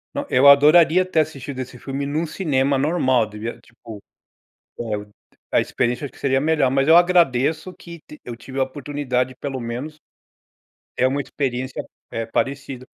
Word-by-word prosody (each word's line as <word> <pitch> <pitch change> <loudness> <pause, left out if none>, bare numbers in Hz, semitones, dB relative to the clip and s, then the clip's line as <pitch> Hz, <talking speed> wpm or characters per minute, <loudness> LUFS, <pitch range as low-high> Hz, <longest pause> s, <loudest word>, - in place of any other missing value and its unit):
Não, - - -2
eu 130 +3 +5
adoraria 155 +5 +6
ter 185 -3 0
assistido 140 -3 -3
esse 130 -1 -7
filme 135 +3 -5
num 150 +4 -1
cinema 140 -5 0
normal 130 -5 +2
devia 110 +2 -7
tipo, 115 -2 -13 1.5
a - - +4
experiência 120 +4 -1
acho 140 - -6
que - - -18
seria 135 -1 +1
melhor, 150 -3 +2
mas 135 +1 +1
eu 165 - +8
agradeço 170 -2 +3
que 170 -1 -12
t 150 - -13
eu 120 -1 -7
tive 130 +4 -9
a - - +4
oportunidade 130 -2 -3
de 130 - -14
pelo 135 -2 -5
menos, 125 +7 -6 1.0
ter 130 - +2
uma 140 +2 -1
experiência, 130 -2 -4 0.3
eh, 115 0 -3
parecida. 135 +1 -3
135 Hz, 160 wpm, -21 LUFS, 125-150 Hz, 1.5 s, eu